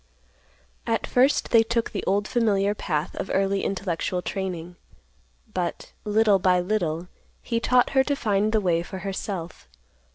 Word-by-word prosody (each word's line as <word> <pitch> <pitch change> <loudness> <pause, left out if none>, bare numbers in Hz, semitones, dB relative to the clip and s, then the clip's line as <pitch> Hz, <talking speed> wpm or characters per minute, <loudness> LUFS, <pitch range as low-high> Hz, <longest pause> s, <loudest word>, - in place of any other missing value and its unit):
At - - 0
first 260 +3 +2
they 230 - +7
took 230 +1 -1
the 200 - -4
old 205 +2 +1
familiar 205 -4 +2
path 155 -7 -2
of - - -4
early 195 0 +1
intellectual 185 -1 -2
training, 180 -3 -4 0.8
but, 175 -2 -3
little 210 -1 +4
by 180 -1 +3
little, 180 -3 -1 0.4
he 230 -1 -1
taught 250 +1 +3
her 265 -1 +4
to 285 - 0
find 210 -4 +1
the 220 - +3
way 170 -3 +1
for 190 +2 -7
herself. 190 - -5
195 Hz, 150 wpm, -25 LUFS, 180-220 Hz, 0.8 s, they